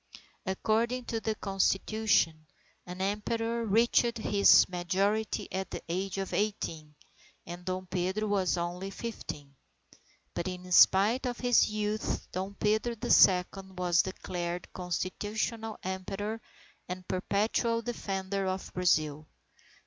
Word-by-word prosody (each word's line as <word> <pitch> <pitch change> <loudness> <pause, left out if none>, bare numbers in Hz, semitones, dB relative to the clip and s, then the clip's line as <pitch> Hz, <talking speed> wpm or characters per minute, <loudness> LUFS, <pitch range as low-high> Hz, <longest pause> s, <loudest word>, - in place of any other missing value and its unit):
According 230 +6 0
to 225 - -2
the 220 -1 -1
Constitution, 195 -5 +1 0.4
an 180 +1 -6
Emperor 225 +4 -1
reached 230 +2 +3
his 205 -2 +5
majority 195 +5 -1
at 190 0 -3
the - - -6
age 190 +3 -2
of 195 -1 -3
eighteen, 165 -8 -2 0.5
and 175 +1 -8
Dom 185 +1 -3
Pedro 190 +4 -1
was 195 -3 +1
only 175 +3 -3
fifteen. 150 -10 -7 0.8
But 170 - -3
in 180 0 -6
spite 210 +8 +5
of 245 -1 -3
his 245 -2 +4
youth, 210 0 -2
Dom 190 +2 -4
Pedro 215 +4 +1
the 215 - -3
Second 190 0 +4
was 175 -2 +3
declared 175 -2 -5
constitutional 210 +5 -3
Emperor 195 +4 -4 0.5
and 180 0 -6
perpetual 220 +5 0
defender 195 -4 -3
of 185 0 -4
Brazil. 155 -4 +1
195 Hz, 120 wpm, -30 LUFS, 180-220 Hz, 0.8 s, his